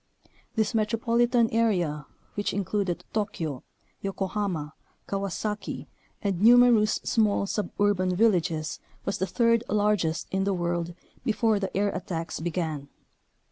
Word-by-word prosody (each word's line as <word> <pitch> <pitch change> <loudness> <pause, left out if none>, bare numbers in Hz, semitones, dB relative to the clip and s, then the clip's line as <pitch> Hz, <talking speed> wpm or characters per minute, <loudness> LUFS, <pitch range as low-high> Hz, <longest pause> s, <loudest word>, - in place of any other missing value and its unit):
This 220 0 +1
metropolitan 230 +2 +2
area 175 -10 +1 0.3
which 205 -1 -2
included 200 -2 -1
Tokyo, 165 - -2 0.4
Yokohama, 195 -5 -2 0.3
Kawasaki, 200 +2 -3 0.4
and 195 -3 -1
numerous 235 -1 +6
small 210 -3 +2
suburban 200 -2 0
villages 170 -7 +1 0.3
was 195 - -2
the 190 - 0
third 230 0 +3
largest 205 -6 +1
in 190 0 +1
the 195 0 +1
world 170 -1 -2 0.3
before 220 -1 +2
the 195 -1 -3
air 205 +1 +2
attacks 165 -5 -4
be 170 +2 -2
gan. 155 -5 -3
200 Hz, 115 wpm, -27 LUFS, 175-215 Hz, 0.4 s, numerous